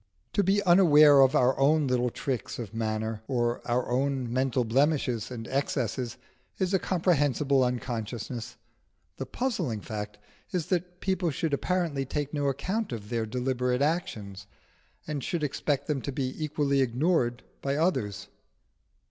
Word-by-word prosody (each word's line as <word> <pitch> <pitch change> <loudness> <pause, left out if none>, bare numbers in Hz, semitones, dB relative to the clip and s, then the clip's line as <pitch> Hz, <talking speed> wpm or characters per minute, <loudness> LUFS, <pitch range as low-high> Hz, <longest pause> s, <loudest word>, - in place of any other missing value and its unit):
To 205 - +3
be 200 +2 +2
unaware 155 -6 +7
of 135 -1 +5
our 125 +1 +4
own 150 +2 +4
little 125 -1 +1
tricks 125 0 -4
of 115 -3 -6
manner 110 -1 -2
or 120 -2 0
our 120 +1 0
own 130 -1 -1
mental 130 -1 +1
blemishes 130 -2 +1
and 115 -3 -6
excesses 130 -3 -2 0.4
is 190 0 0
a 190 - +4
comprehensible 145 -7 +2
unconsciousness; 120 -1 -4 0.6
the 135 - -5
puzzling 225 - -2
fact 105 0 -6 0.3
is 180 -4 -1
that 180 -1 -2
people 190 -2 0
should 155 +1 -2
apparently 165 -2 0
take 145 +2 -3
no 145 -1 0
account 185 - -2
of 105 -3 -6
their 115 -2 -1
deliberate 125 +2 0
actions, 110 - -2 0.6
and 150 -3 -4
should 170 +2 -2
expect 145 0 -1
them 150 -4 -1
to 140 - -4
be 130 -1 -2
equally 140 -2 +1
ignored 125 -1 +1 0.2
by 140 0 -1
others. 105 - 0
135 Hz, 145 wpm, -28 LUFS, 120-155 Hz, 0.6 s, unaware